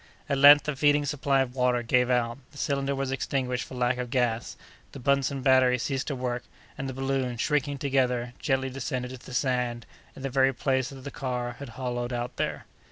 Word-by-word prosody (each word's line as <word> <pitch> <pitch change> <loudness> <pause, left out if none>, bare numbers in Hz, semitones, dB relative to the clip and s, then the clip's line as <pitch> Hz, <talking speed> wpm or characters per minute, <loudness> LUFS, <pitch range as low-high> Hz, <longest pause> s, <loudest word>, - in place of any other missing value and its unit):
At 140 - 0
length 145 +1 +9
the 150 -1 -2
feeding 145 +1 +3
supply 140 -1 +1
of 125 -2 -2
water 125 -2 +1
gave 125 +1 +2
out; 120 0 +1
the 145 - -15
cylinder 140 -1 -1
was 135 -1 -2
extinguished 130 -2 -1
for 130 - -9
lack 125 0 +1
of 125 -1 -3
gas; 120 -3 -1 0.4
the - - -8
Buntzen 140 0 +1
battery 130 -2 +5
ceased 135 +2 -2
to 140 - -2
work, 125 -1 -2 0.3
and 135 0 -4
the - - -4
balloon, 135 -2 -1
shrinking 145 +2 0
together, 125 -3 0
gently 135 -1 0
descended 125 -1 -3
to 130 -1 -10
the 125 - -8
sand, 125 -3 0 0.3
in 135 - -10
the 135 - -1
very 135 0 +3
place 130 -1 0
that 135 -1 -10
the 140 - -6
car 125 -3 -3
had 140 -3 -7
hollowed 125 -1 -3
out 120 0 -4
there. - - -2
130 Hz, 205 wpm, -27 LUFS, 125-135 Hz, 0.4 s, length